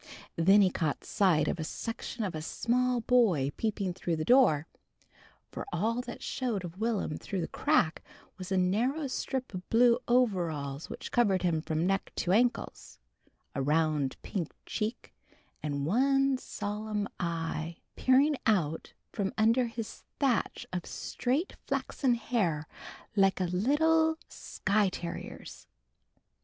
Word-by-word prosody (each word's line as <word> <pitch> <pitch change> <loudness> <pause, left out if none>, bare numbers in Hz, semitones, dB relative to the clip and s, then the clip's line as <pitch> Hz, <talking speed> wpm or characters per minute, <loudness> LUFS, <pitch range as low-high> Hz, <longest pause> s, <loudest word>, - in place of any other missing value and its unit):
Then 195 +5 +6
he 185 - +3
caught 155 -5 -1
sight 165 -7 +3
of - - -1
a - - -1
section 225 +6 -5
of 190 - -2
a 155 - -4
small 245 +8 0
boy 210 - +3
peeping 200 -4 -1
through 175 -2 -2
the 155 0 -3
door, 240 - +5 0.9
for - - -5
all 225 +8 0
that 245 -1 -8
showed 230 -8 -2
of 175 +2 -9
Will'm 215 -9 -1
through 190 -3 -3
the 165 - -2
crack 160 -1 +1 0.3
was 185 -1 -8
a 190 - +2
narrow 235 +12 +1
strip 260 -2 -3
of 185 0 -7
blue 235 +1 +5
overalls 170 - 0
which - - -7
covered 200 -7 +3
him 165 -3 +1
from 160 +1 -1
neck 195 +1 0
to 175 - 0
ankles, 240 +5 0 0.6
a 135 - -2
round 150 -1 +1
pink 185 -7 -3
cheek 220 +1 -4 0.5
and 140 -2 -2
one 270 - +3
solemn 210 -1 -3
eye 165 -1 -3 0.2
peering 275 +4 +4
out 165 -8 +1 0.2
from 195 -2 -1
under 230 +3 +3
his 230 -1 -6 0.2
thatch 265 -5 0
of 180 -2 -3
straight 275 +9 -2
flaxen 255 -4 0
hair 185 -11 -1 0.5
like 195 -2 +3
a - - +1
little 315 - +3
Skye 200 0 0
terrier's. 175 -2 -7
200 Hz, 140 wpm, -30 LUFS, 170-245 Hz, 0.9 s, Then